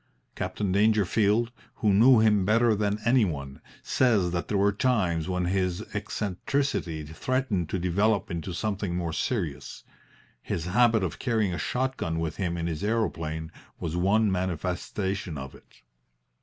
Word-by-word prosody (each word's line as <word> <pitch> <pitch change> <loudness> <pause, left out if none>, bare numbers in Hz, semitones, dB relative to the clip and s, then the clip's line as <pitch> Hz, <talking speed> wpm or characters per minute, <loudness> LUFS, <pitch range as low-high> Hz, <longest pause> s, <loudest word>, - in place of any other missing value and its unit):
Captain 100 -3 -2
Dangerfield, 105 +2 +2 0.2
who 105 -4 +2
knew 115 +4 +7
him 105 -3 +4
better 115 +3 +3
than 105 0 0
any 120 0 +5
one, 70 -7 -4 0.2
says 105 -9 +2
that 85 0 -2
there 105 - 0
were 100 +1 +3
times 100 - 0
when 90 -1 0
his 90 -1 0
eccentricity 100 - -2
threatened 100 - -1
to 95 - -1
develop 100 +4 +1
into 85 +2 -4
something 100 -1 -2
more 85 -2 -2
serious. 85 - -3 0.6
His 80 - -3
habit 110 +3 +3
of 90 - -3
carrying 110 -6 0
a 85 - -3
shot 130 +1 -1
gun 80 0 -2
with 80 -1 -3
him 85 -3 -2
in 85 - -2
his 80 -1 -3
aeroplane 80 -8 -2 0.3
was 85 -1 -3
one 100 +4 +3
manifestation 90 0 -2
of 65 -1 -7
it. - - -20
95 Hz, 150 wpm, -27 LUFS, 85-110 Hz, 0.6 s, knew